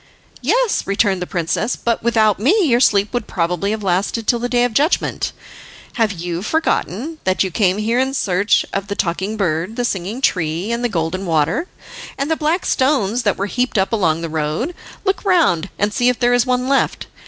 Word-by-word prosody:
"Yes," 445 - +1
returned 195 -1 +1
the 180 - -3
princess, 180 +7 -1
"but 235 -1 -1
without 220 -3 +2
me 355 - +3
your 240 -5 +3
sleep 205 -3 +3
would 245 -3 -2
probably 175 +2 -1
have 215 0 -3
lasted 195 +5 0
till 240 +2 +2
the 245 +1 -2
day 245 -1 +2
of 245 -2 0
judgment. 295 +9 +1 0.6
Have 225 -3 +1
you 175 -2 -4
forgotten 315 - -1
that 185 -2 +1
you 190 - -3
came 190 0 +2
here 225 +3 0
in 265 +1 0
search 200 -3 +2
of 195 0 -2
the 200 - -3
Talking 190 +4 -2
Bird, 175 +1 -1
the 245 - -1
Singing 195 +3 -3
Tree, 175 - 0
and 235 +1 -2
the 245 - +1
Golden 180 0 -2
Water, 165 - +1 0.5
and 275 +3 -2
the - - +3
black 315 +4 0
stones 255 -5 +1
that 205 -4 0
were 195 - -1
heaped 245 +3 -1
up 190 +3 +1
along 165 -7 +1
the 165 - -3
road? 155 - -2 0.3
Look 390 0 0
round 320 - +2
and 205 +1 0
see 245 +2 +3
if 250 - -1
there 245 0 +3
is 245 +1 +2
one 250 0 0
left. 275 0 +1
215 Hz, 200 wpm, -19 LUFS, 185-250 Hz, 0.6 s, me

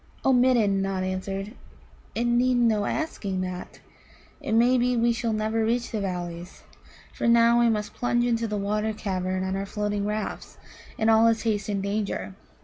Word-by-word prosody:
"O 265 - +5
Midden," 240 -6 +3
Nod 195 -1 -2
answered, 195 +2 -4 0.6
"it 235 - 0
needed 245 +1 +2
no 215 -3 +2
asking 200 -12 -3
that. 185 -1 -6 0.6
It - - -3
may 240 +3 +4
be 250 0 +1
we 235 +1 +3
shall 230 -1 -2
never 220 +1 0
reach 235 +2 -1
the 215 - -2
Valleys. 175 -1 -5 0.5
For - - -2
now 235 0 +5
we 235 -1 +4
must 210 -2 -2
plunge 240 0 0
into 230 -1 0
the 210 -1 -2
water 210 +2 -1
cavern 185 -3 -2
on 190 0 -2
our 195 +1 -3
floating 205 0 -2
rafts, 210 0 -4 0.4
and 220 - +1
all 225 +1 +5
is 230 -1 +1
haste 215 -2 -1
and 200 -2 -1
danger. 200 -1 -3
215 Hz, 175 wpm, -26 LUFS, 195-235 Hz, 0.6 s, O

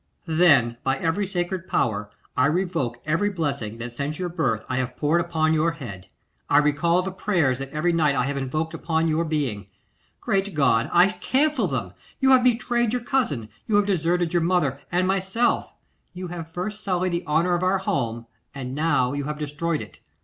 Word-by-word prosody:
'Then 150 -9 +4
by 135 0 +1
every 175 +7 0
sacred 180 0 -3
power 105 -1 0 0.3
I 130 +2 +4
revoke 165 -8 -1
every 170 +7 +1
blessing 140 - -3
that 120 +1 -6
since 145 +4 -3
your 180 -1 -3
birth 130 -11 -1
I 130 - -2
have 130 -1 -2
poured 155 +3 +2
upon 160 -2 +1
your 160 +1 +2
head. 105 - -9 0.4
I 145 - +5
recall 160 +4 +3
the 190 - -3
prayers 170 -10 +1
that 135 0 -5
every 160 +4 0
night 155 -4 +2
I 125 - +2
have 140 +2 -2
invoked 155 +5 -2
upon 165 0 0
your 160 +1 +1
being. 140 - -2 0.5
Great 195 -1 -1
God! 135 -3 +3
I 185 - +6
cancel 290 +8 +1
them. - - -3 0.3
You 265 -1 +4
have 255 -1 +6
betrayed 240 -1 +2
your 250 -1 -1
cousin; 190 - -1 0.2
you 215 - +1
have 205 0 +4
deserted 175 -2 +1
your 175 - +3
mother 160 -6 +1
and 180 +1 +2
myself; 195 +5 0 0.4
you 180 0 -6
have 165 -2 -6
first 205 +5 -5
sullied 185 -2 0
the 170 +1 -2
honour 165 +4 +2
of 175 - +1
our 185 +1 +2
house, 120 -11 -2 0.3
and 130 -2 -5
now 145 -4 +1
you 145 -1 -3
have 150 +1 -4
destroyed 150 +2 -2
it. - - -15
165 Hz, 190 wpm, -24 LUFS, 140-185 Hz, 0.5 s, I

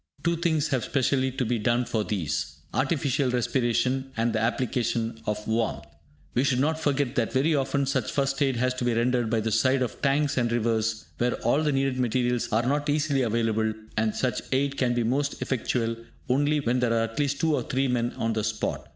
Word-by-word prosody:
Two 170 0 +2
things 160 -3 0
have 130 -4 0
specially 130 -1 +1
to 130 -1 -1
be 115 0 0
done 120 +3 +1
for 110 -2 -1
these, 80 - -2 0.2
artificial 135 -1 +1
respiration, 125 +1 0
and 115 +1 +1
the 110 - +1
application 115 -1 -1
of 105 0 -2
warmth. 110 0 -1 0.5
We 125 - +2
should 130 -2 +2
not 155 +3 +1
forget 145 -4 0
that 120 -5 0
very 145 +5 +2
often 140 0 +1
such 135 - -1
'First 140 0 0
aid' 135 -2 +2
has 125 +2 +1
to 130 - -4
be 120 -1 +1
rendered 120 0 +1
by 115 -1 +1
the 110 +1 -1
side 130 +4 +3
of 125 - -5
tanks 140 0 +1
and 120 -2 +1
rivers, 110 -1 0
where 120 +1 +1
all 120 +6 +3
the 150 -1 +1
needed 135 -1 0
materials 125 0 0
are 115 +2 +2
not 145 +3 0
easily 145 -2 +1
available, 110 -2 0 0.2
and 110 0 0
such 130 -1 -1
aid 140 +1 +1
can 125 -3 +1
be 120 - +1
most 140 +5 0
effectual 115 -2 -1 0.3
only 145 +4 +2
when 125 -1 +1
there 120 -2 +1
are 115 0 +2
at 115 +4 -4
least 145 -1 0
two 160 -1 +2
or - - 0
three 135 +1 0
men 120 -1 0
on 115 0 0
the 110 -1 -1
spot. - - -3
125 Hz, 210 wpm, -26 LUFS, 115-140 Hz, 0.5 s, side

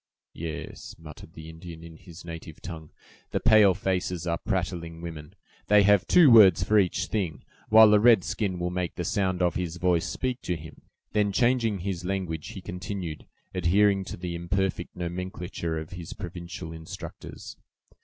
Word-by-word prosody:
"Yes," 80 -1 -7
muttered 80 0 -12
the 80 0 -10
Indian, 80 0 -10
in 85 -1 -11
his 85 0 -13
native 80 -2 -9
tongue; 80 -3 -8 0.4
"the - - -1
pale 105 -4 +6
faces 90 -3 -2
are 85 -1 -1
prattling 85 -3 -3
women! 85 0 -8 0.3
they 105 0 +6
have 100 -2 +4
two 165 -7 +7
words 105 -5 +7
for 105 0 +4
each 95 -1 +1
thing, 90 -9 -3 0.3
while 110 -1 +8
a 105 - +6
red 110 -4 +6
skin 95 -2 -2
will 90 0 -2
make 90 -1 -3
the 90 - -3
sound 95 -2 0
of 90 - +2
his 90 -2 -3
voice 90 -2 +1
speak 130 -1 -3
for 90 - -1
him." 80 0 -11 0.3
Then, 105 -1 +1
changing 115 -3 +1
his 90 -2 -3
language, 90 -4 -3
he 95 - -8
continued, 90 -3 -6 0.3
adhering 95 +2 +3
to - - -7
the 90 0 -5
imperfect 90 +1 -2
nomenclature 90 -1 -4
of 80 0 -7
his 90 -3 -7
provincial 85 -1 -7
instructors. 80 0 -9
90 Hz, 165 wpm, -27 LUFS, 85-100 Hz, 0.4 s, while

